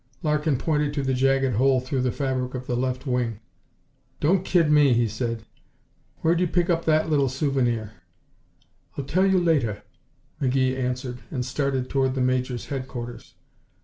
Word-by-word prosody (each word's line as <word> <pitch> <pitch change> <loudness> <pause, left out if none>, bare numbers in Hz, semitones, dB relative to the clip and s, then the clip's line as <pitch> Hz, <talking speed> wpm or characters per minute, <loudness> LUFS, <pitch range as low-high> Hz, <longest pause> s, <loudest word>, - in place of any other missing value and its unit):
Larkin 150 -2 +1
pointed 150 0 0
to 140 - -1
the 135 0 0
jagged 135 -2 +2
hole 130 +1 +4
through 130 +1 -2
the 125 -1 +1
fabric 130 -2 -2
of 130 0 -5
the 125 - -2
left 130 +2 -2
wing. 125 -5 -1 0.8
"Don't 180 +5 +2
kid 170 -5 +3
me!" 145 -3 +5
he 120 0 +2
said. 115 +1 -3 0.8
"Where'd 165 +1 +2
you 180 - +2
pick 175 +1 +1
up 170 0 0
that 155 -1 +3
little 140 -3 +3
souvenir?" 125 -5 0 1.1
"I'll 140 - -3
tell 185 +7 +2
you 190 -1 +3
later," 145 - +1 0.6
McGee 130 -1 +2
answered 125 -1 -3
and 125 -4 -3
started 135 -1 -1
toward 130 -1 0
the 130 - 0
Major's 125 -1 0
headquarters. 130 -3 -6
130 Hz, 160 wpm, -25 LUFS, 125-150 Hz, 1.1 s, me